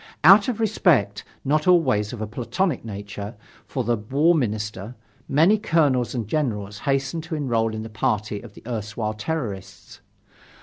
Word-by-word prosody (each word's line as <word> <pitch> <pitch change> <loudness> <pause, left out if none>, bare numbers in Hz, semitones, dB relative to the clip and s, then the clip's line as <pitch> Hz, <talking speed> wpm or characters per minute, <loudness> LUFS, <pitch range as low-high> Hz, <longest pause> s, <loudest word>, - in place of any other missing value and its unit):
Out 195 +6 +8
of 245 -4 -2
respect, 170 - +2 0.2
not 150 +4 +1
always 130 - +3
of 120 - -7
a - - -1
platonic 125 - -2
nature, 105 0 -7 0.3
for 130 - -2
the 120 +1 +1
War 140 +11 +2
Minister, 110 - -2 0.3
many 165 +10 +4
colonels 145 - +1
and 115 -4 -3
generals 105 -8 -2
hastened 135 +4 0
to 160 0 -4
enrol 115 -6 0
in 110 - -4
the - - -6
party 105 -1 -1
of 110 -4 -13
the - - -14
erstwhile 110 -1 -3
terrorists. 110 - -5
120 Hz, 150 wpm, -23 LUFS, 105-155 Hz, 0.3 s, Out